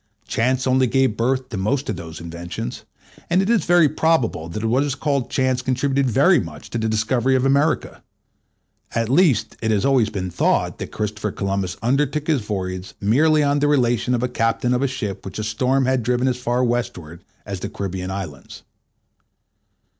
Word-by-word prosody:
Chance 130 +3 0
only 130 0 +3
gave 130 -2 +2
birth 130 +3 0
to 110 - -5
most 130 +9 -1
of 105 - -2
those 80 -3 -8
inventions; 85 -4 -6 0.4
and 175 +2 +3
it 195 +4 +2
is 235 - +2
very 175 -2 +5
probable 145 - 0
that 105 +6 -4
what 120 +4 +2
is 145 -2 -1
called 140 -3 -1
chance 130 -1 +1
contributed 135 +1 0
very - - +5
much - - -8
to 115 - -2
the 110 0 0
discovery 120 +4 +1
of 130 0 +1
America; 140 +4 +1 0.9
at 115 -1 0
least, 140 - +2
it 110 - -1
has 105 -3 +2
been - - +2
always 130 -6 +3 0.2
thought - - 0
that - - -6
Christopher 105 0 -3
Columbus 95 -2 -2
undertook 140 +4 +1
his 155 -6 +1
voyage 95 -3 -4
merely 150 +9 +3
on 145 0 +2
the 145 - +2
relation 125 -3 +2
of 120 - -2
a - - +2
captain 120 0 0
of 125 - +1
a 140 - +2
ship 125 -7 -4
which 95 -1 -7
a 110 - -3
storm 125 +5 +1
had 130 -1 +1
driven 125 +2 0
as 125 -1 0
far 125 0 0
westward 105 -10 -3 0.2
as 100 -2 -5
the 100 - -5
Caribbean 95 -3 -4
Islands. 90 -9 -7
125 Hz, 185 wpm, -21 LUFS, 105-135 Hz, 0.9 s, very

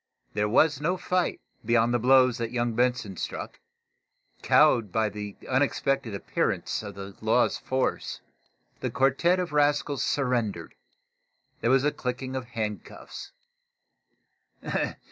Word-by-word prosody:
There 105 0 0
was 145 +4 +3
no 180 +5 0
fight, 180 0 -1 0.2
beyond 115 +1 +2
the 120 - +2
blows 130 0 +4
that 115 -1 -2
young 120 -1 -1
Benson 120 -5 0
struck. - - -5 0.8
Cowed 110 -5 +4
by 110 +1 +1
the 105 -1 -7
unexpected 135 -3 0
appearance 100 - -1
of - - -8
the 100 -1 -8
law's 110 +3 +2
force, 130 0 -2 0.6
the - - -2
quartette 140 +7 +2
of 175 -4 -3
rascals 145 -1 +2
surrendered. 120 - -1 0.9
There 115 - 0
was 130 +1 +4
a 150 - +2
clicking 130 0 -4
of 130 -1 -3
handcuffs. 110 -5 -6
125 Hz, 125 wpm, -27 LUFS, 110-135 Hz, 0.9 s, blows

